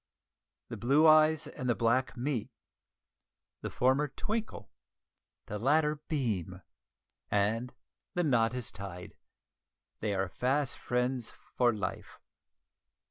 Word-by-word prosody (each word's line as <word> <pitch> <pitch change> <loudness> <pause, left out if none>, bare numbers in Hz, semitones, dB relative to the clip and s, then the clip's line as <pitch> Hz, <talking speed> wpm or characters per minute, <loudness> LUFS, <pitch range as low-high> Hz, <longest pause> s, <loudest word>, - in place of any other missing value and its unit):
The - - -5
blue 140 +6 +4
eyes 155 0 +6
and 125 - -5
the 120 - +3
black 120 +3 +1
meet; 125 -2 -2 1.1
the - - -4
former 130 +4 +2
twinkle, 220 +9 -4 0.7
the 105 - -5
latter 150 +5 +2
beam, 100 - -2 0.7
and 110 +5 +1 0.4
the 175 - +2
knot 120 -5 +2
is 125 -4 -2
tied; 90 -2 -8 0.8
they 105 -2 -1
are 95 0 0
fast 130 +7 -1
friends 125 -1 -1 0.3
for 120 -1 +4
life! 100 -5 -5
125 Hz, 110 wpm, -31 LUFS, 110-145 Hz, 1.1 s, eyes